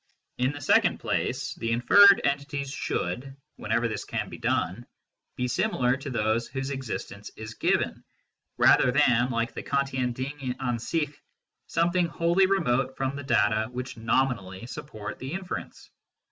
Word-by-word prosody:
In 125 +2 +2
the 145 0 -8
second 145 - +3
place 130 +1 -2
the 115 -3 -3
inferred 200 +12 +7
entities 140 0 -2
should, 135 +2 -3 0.2
whenever 115 +3 0
this 110 - -4
can - - -4
be - - -9
done, - - -1 0.5
be 125 - -1
similar 125 +1 +1
to 135 +1 -7
those 115 -1 0
whose 135 +1 -4
existence 115 -6 -5
is 110 0 -7
given, - - 0 0.5
rather 125 - +5
than, 125 -3 +3
like 115 -1 -1
the - - -5
Kantian 135 -3 -1
Ding 130 +1 -4
an 125 -3 -1
sich, 150 +5 -2 0.5
something 175 +1 +1
wholly 170 +4 +2
remote 135 -9 +1
from 135 0 -1
the 145 - -5
data 110 -4 +2
which 125 +1 -5
nominally 115 -4 -1
support 110 -5 -7
the 135 +4 -6
inference. 190 -1 -6
130 Hz, 145 wpm, -27 LUFS, 115-140 Hz, 0.5 s, inferred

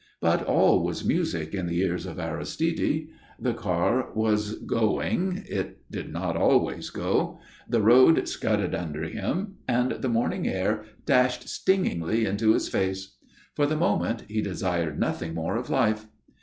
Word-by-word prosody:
But - - +2
all - - +4
was - - -3
music 80 0 0
in 95 -3 -2
the 85 0 -1
ears 90 -1 -1
of 80 - -7
Aristide. 155 - -1 0.3
The 125 -2 0
car 105 +4 0
was 105 -1 +1
going 180 - 0
(it - - -4
did - - -6
not - - -2
always - - +2
go), - - -1 0.3
the 115 -2 +2
road 130 +8 +6
scudded 105 -4 0
under 80 -2 -3
him, 160 - -3
and 125 +1 +2
the 130 - -2
morning 115 0 0
air 105 +3 -1 0.2
dashed 125 -3 +2
stingingly 115 - +1
into 110 +2 +3
his - - 0
face. 95 +1 -2 0.4
For 145 - +2
the 155 +1 0
moment 115 -8 0
he 110 +1 -1
desired 90 -5 -2
nothing 80 -1 -2
more 80 0 -2
of - - -3
life. 110 0 +1
110 Hz, 150 wpm, -26 LUFS, 90-125 Hz, 0.4 s, road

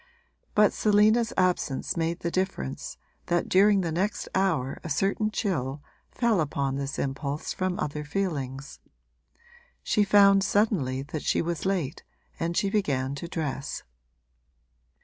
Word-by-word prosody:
But 210 -1 +5
Selina's 215 +2 +3
absence 180 -7 0
made 165 +1 -1
the 170 - -2
difference 165 - -3 0.3
that 175 0 +1
during 200 +1 +5
the 170 -3 -2
next 190 +6 -1
hour 175 -9 0
a 165 - -5
certain 195 +7 +1
chill 150 - -2 0.3
fell 230 -7 +1
upon 140 -2 -1
this 140 +1 -3
impulse 140 +2 -3
from 185 -1 -2
other 150 0 -3
feelings: 140 -5 -3 1.0
she 210 - +2
found 200 -1 +6
suddenly 185 - +1
that 150 +1 -5
she - - +1
was 170 +2 -2
late 175 -6 -2 0.4
and 170 +1 -1
she 200 - +1
began 140 -10 0
to 140 +4 -6
dress. 145 -4 -4
170 Hz, 130 wpm, -27 LUFS, 140-195 Hz, 1.0 s, found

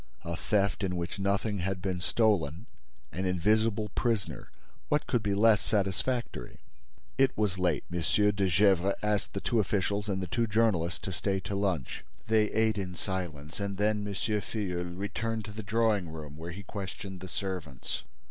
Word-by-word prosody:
A 85 0 -3
theft 100 +3 +1
in 90 -1 0
which 85 +3 -3
nothing 100 +1 +1
had 95 +1 -1
been 95 -1 -2
stolen; 95 -4 +2 0.5
an 95 +2 -2
invisible 105 +4 +2
prisoner: 115 -1 -1 0.4
what 150 - +2
could 125 - +1
be 100 -1 0
less 105 0 +5
satisfactory? 100 - -1 0.6
It 135 -1 +4
was 100 -3 +1
late. 90 -5 +2
M. 85 - 0
de 100 +1 +3
Gesvres 95 +1 +4
asked 105 -1 0
the 105 +4 0
officials 100 +1 0
and 95 -1 0
the 95 - -2
two 115 +7 0
journalists 105 -6 +2
to 95 - -4
stay 95 +1 0
to 100 - -5
lunch. 95 -8 -1 0.2
They 110 -1 +4
ate 110 -1 +2
in 90 -2 -4
silence 85 -5 -4
and 100 -1 -2
then 105 +1 +2
M. - - -3
Filleul 95 -5 -2
returned 110 +2 -2
to 105 - -7
the 110 +2 -6
drawing 110 -4 +2
room, 75 -2 -8
where 80 +2 -7
he 100 +4 -7
questioned 95 -2 -6
the 95 - -7
servants. 90 -7 -4
100 Hz, 165 wpm, -30 LUFS, 90-105 Hz, 0.6 s, less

